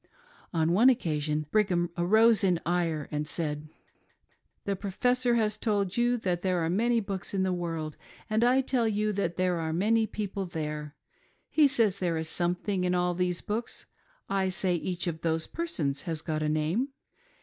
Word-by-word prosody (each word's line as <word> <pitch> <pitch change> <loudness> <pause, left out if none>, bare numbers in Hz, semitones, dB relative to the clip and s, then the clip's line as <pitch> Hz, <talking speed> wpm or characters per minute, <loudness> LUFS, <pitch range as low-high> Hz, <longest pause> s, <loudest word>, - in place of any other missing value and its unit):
On 165 -1 +1
one 225 +9 +6
occasion, 155 - 0
Brigham 180 -5 +2
arose 220 +5 +4
in 180 -3 +3
ire, 165 -4 0
and 150 0 -2
said: 150 -2 -3 0.5
" - - -44
The 200 - 0
Professor 245 +6 +1
has 215 -2 +1
told 200 -4 0
you 240 +1 +2
that 180 -6 -1
there 185 -2 +1
are 165 - 0
many 235 +5 +2
books 195 -2 -5
in 190 - +1
the 185 -1 +1
world, 165 -3 -4 0.3
and 215 +2 +1
I 255 +2 +4
tell 250 -3 +1
you 210 0 0
that 175 -4 -2
there 180 -2 +1
are 160 -1 -2
many 215 +6 +2
people 200 -3 -4
there. 150 -3 -5 0.6
He 305 -2 +6
says 225 -8 +2
there 170 -3 0
is 160 0 -3
something 180 +3 -1
in 180 0 +1
all 180 0 +1
these 180 0 -1
books; 225 +3 -4 0.4
I 195 -1 +1
say 185 0 0
each 175 +1 -2
of 165 -2 -3
those 160 -1 0
persons 155 - -2
has 165 -4 -3
got 155 -1 -2
a 155 - 0
name. 155 - 0
180 Hz, 180 wpm, -29 LUFS, 165-215 Hz, 0.6 s, one